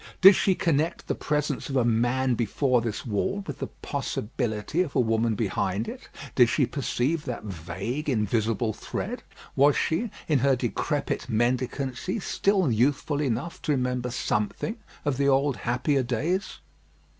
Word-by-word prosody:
Did 195 Hz, +2 st, +10 dB
she 190 Hz, -, +2 dB
connect 165 Hz, +1 st, 0 dB
the -, -, -1 dB
presence 150 Hz, -2 st, -1 dB
of 135 Hz, -, -3 dB
a 125 Hz, -3 st, +3 dB
man 120 Hz, +3 st, +2 dB
before 120 Hz, +2 st, +1 dB
this 115 Hz, -2 st, -4 dB
wall 125 Hz, -, -1 dB
with 145 Hz, -, -6 dB
the -, -, -3 dB
possibility 110 Hz, +6 st, -2 dB
of 165 Hz, -6 st, -3 dB
a -, -, +4 dB
woman 115 Hz, -1 st, +2 dB
behind 100 Hz, 0 st, -1 dB
it? -, -, -8 dB, 0.2 s
Did -, -, +5 dB
she -, -, +3 dB
perceive 150 Hz, +6 st, -1 dB
that 125 Hz, -, -4 dB
vague, 100 Hz, -, -4 dB
invisible 110 Hz, -1 st, +1 dB
thread? -, -, -5 dB, 0.3 s
Was 145 Hz, +1 st, +5 dB
she, 220 Hz, +9 st, 0 dB, 0.2 s
in 150 Hz, -4 st, +3 dB
her 135 Hz, +1 st, +4 dB
decrepit 130 Hz, +3 st, -2 dB
mendicancy, 130 Hz, -, -1 dB
still 190 Hz, -5 st, +1 dB
youthful 140 Hz, +5 st, +1 dB
enough 135 Hz, +4 st, -2 dB
to 150 Hz, -, +1 dB
remember 125 Hz, -2 st, -1 dB
something 120 Hz, -, -1 dB, 0.3 s
of 145 Hz, -3 st, 0 dB
the 140 Hz, 0 st, +2 dB
old 140 Hz, 0 st, +3 dB
happier 125 Hz, +4 st, +1 dB
days? 150 Hz, -, -1 dB
130 Hz, 150 wpm, -26 LUFS, 115-145 Hz, 0.3 s, Did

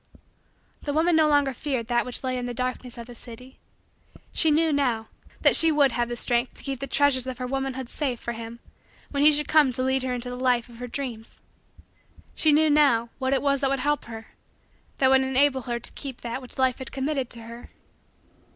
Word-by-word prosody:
The 290 Hz, -, -3 dB
woman 325 Hz, +3 st, +2 dB
no 315 Hz, -1 st, +4 dB
longer 285 Hz, -2 st, +2 dB
feared 255 Hz, -2 st, -3 dB
that 240 Hz, +1 st, 0 dB
which 250 Hz, -, -3 dB
lay 255 Hz, -1 st, -1 dB
in 245 Hz, -1 st, -3 dB
the 245 Hz, -, -5 dB
darkness 250 Hz, 0 st, -4 dB
of 235 Hz, -, -7 dB
the 245 Hz, -, -11 dB
city. 245 Hz, +2 st, -11 dB, 0.7 s
She 320 Hz, -, +3 dB
knew, 315 Hz, +1 st, +3 dB
now, 245 Hz, -6 st, 0 dB, 0.3 s
that -, -, +6 dB
she 325 Hz, -1 st, +7 dB
would 285 Hz, -3 st, +3 dB
have 240 Hz, 0 st, -2 dB
strength 240 Hz, +2 st, 0 dB
to -, -, -12 dB
keep 270 Hz, -2 st, -4 dB
the 275 Hz, -, -4 dB
treasures 270 Hz, -2 st, +2 dB
of 255 Hz, -1 st, -5 dB
her 255 Hz, -, -4 dB
womanhood 265 Hz, 0 st, -3 dB
safe 255 Hz, -2 st, -2 dB
for 235 Hz, -, -5 dB
him 230 Hz, 0 st, -8 dB, 0.5 s
should 280 Hz, -, 0 dB
he 300 Hz, 0 st, +5 dB
come 300 Hz, -3 st, +4 dB
to 255 Hz, +1 st, -2 dB
lead 265 Hz, 0 st, +1 dB
her 255 Hz, 0 st, -2 dB
into 245 Hz, 0 st, -4 dB
the -, -, -5 dB
life 245 Hz, -2 st, +1 dB
of 235 Hz, -, -14 dB
her 250 Hz, -, -5 dB
dreams. 240 Hz, -4 st, -6 dB, 1.0 s
She 310 Hz, -, +3 dB
knew, 305 Hz, +1 st, +4 dB
now, 260 Hz, -6 st, +3 dB
what 260 Hz, -1 st, -1 dB
it 275 Hz, -1 st, +1 dB
was 280 Hz, -1 st, +1 dB
that 270 Hz, -, +1 dB
would 275 Hz, -, 0 dB
help 295 Hz, +2 st, -1 dB
her 225 Hz, -1 st, -10 dB, 0.7 s
that 265 Hz, -1 st, +3 dB
would 265 Hz, 0 st, +5 dB
enable 265 Hz, 0 st, +2 dB
her 235 Hz, 0 st, -1 dB
to -, -, -6 dB
keep 270 Hz, -4 st, -8 dB
that 235 Hz, +2 st, -5 dB
which 250 Hz, -, -11 dB
Life 260 Hz, -1 st, +1 dB
had 260 Hz, -, -7 dB
committed 270 Hz, -2 st, -2 dB
to 235 Hz, -, -1 dB
her. 235 Hz, +1 st, -11 dB
260 Hz, 215 wpm, -25 LUFS, 240-280 Hz, 1.0 s, she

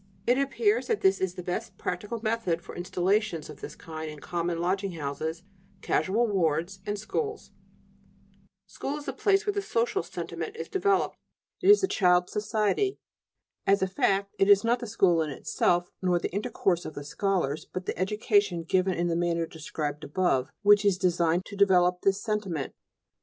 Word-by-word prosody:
It 245 Hz, +2 st, +3 dB
appears 415 Hz, -, +1 dB
that 450 Hz, -3 st, 0 dB
this 385 Hz, 0 st, +3 dB
is 185 Hz, -1 st, -1 dB
the 180 Hz, -, -6 dB
best 185 Hz, +3 st, -4 dB
practical 210 Hz, +6 st, -4 dB
method 215 Hz, -7 st, 0 dB
for -, -, -10 dB
installations 180 Hz, -2 st, 0 dB
of 150 Hz, -, -14 dB
this -, -, -7 dB
kind 160 Hz, -1 st, -7 dB
in 150 Hz, -, -8 dB
common 170 Hz, +2 st, -2 dB
lodging 190 Hz, +2 st, -1 dB
houses, 160 Hz, +2 st, -4 dB, 0.4 s
casual 220 Hz, +6 st, +1 dB
wards, 175 Hz, -2 st, 0 dB
and 205 Hz, 0 st, -1 dB
schools." 420 Hz, -, -4 dB, 1.1 s
School 285 Hz, +2 st, -5 dB
is 295 Hz, -, -9 dB
the -, -, -3 dB
place 395 Hz, +1 st, +2 dB
where 410 Hz, -, +1 dB
the 405 Hz, -, -1 dB
"social 240 Hz, +2 st, 0 dB
sentiment" 435 Hz, -, -6 dB
is -, -, -6 dB
developed; 390 Hz, 0 st, +1 dB, 0.4 s
it 380 Hz, -, +3 dB
is 415 Hz, -, +8 dB
the 385 Hz, -, +2 dB
child's 180 Hz, -, +3 dB
society. 215 Hz, -, 0 dB, 0.7 s
As 195 Hz, 0 st, +4 dB
a -, -, +2 dB
fact, 195 Hz, +1 st, 0 dB
it 195 Hz, -, +4 dB
is 200 Hz, -1 st, +7 dB
not 235 Hz, +2 st, +2 dB
the 240 Hz, -, -6 dB
school 175 Hz, -5 st, +3 dB
in 155 Hz, -, -1 dB
itself, 175 Hz, +5 st, 0 dB
nor 180 Hz, -2 st, +2 dB
the 170 Hz, -, -3 dB
intercourse 190 Hz, -3 st, 0 dB
of 155 Hz, -, -7 dB
the 145 Hz, -, -6 dB
scholars, 165 Hz, -2 st, -1 dB
but 185 Hz, 0 st, -5 dB
the -, -, -2 dB
education 200 Hz, -2 st, +1 dB
given 185 Hz, +2 st, +1 dB
in 175 Hz, -, 0 dB
the 170 Hz, -, 0 dB
manner 170 Hz, -1 st, 0 dB
described 155 Hz, -2 st, -5 dB
above 145 Hz, -4 st, +1 dB
which 205 Hz, 0 st, +6 dB
is 200 Hz, -3 st, +3 dB
designed 175 Hz, -1 st, +1 dB
to 200 Hz, -, -9 dB
develop 180 Hz, -3 st, +4 dB
this 195 Hz, 0 st, +2 dB
sentiment. 200 Hz, -, -2 dB
190 Hz, 180 wpm, -28 LUFS, 170-215 Hz, 1.1 s, is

